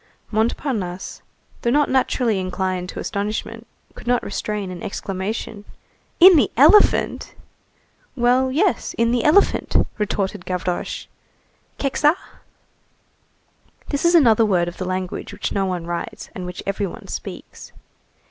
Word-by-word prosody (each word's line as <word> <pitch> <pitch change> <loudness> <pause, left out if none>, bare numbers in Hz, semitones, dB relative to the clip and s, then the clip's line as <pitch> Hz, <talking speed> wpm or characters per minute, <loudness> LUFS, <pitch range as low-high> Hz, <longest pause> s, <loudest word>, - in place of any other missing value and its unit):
Montparnasse, 220 -4 -2 0.4
though 235 - 0
not 290 +4 +3
naturally 250 -5 +1
inclined 185 -1 -2
to - - -7
astonishment, 205 +2 -4 0.3
could - - -13
not 245 0 +2
restrain 205 -2 -4
an 175 -2 -8
exclamation. 200 +2 -4 0.6
"In 365 -1 +9
the 250 -9 +3
elephant!" 315 - +4 0.8
"Well, 255 +1 +2
yes, 350 +8 0
in 230 0 +2
the 245 -1 +1
elephant!" 325 +7 +3 0.2
retorted 205 -2 -2
Gavroche. 180 -1 -3 0.7
"Kekçaa?" 295 +3 +2 1.7
This 285 - -2
is 340 0 +4
another 230 -8 +5
word 180 -5 +2
of 175 - -7
the 185 - -4
language 185 +1 -4
which 205 - -4
no 195 -1 0
one 180 -2 -3
writes, 170 0 -5
and 180 -1 -6
which 180 - -7
every 195 0 -1
one - - -10
speaks. - - -8
210 Hz, 130 wpm, -21 LUFS, 185-260 Hz, 1.7 s, In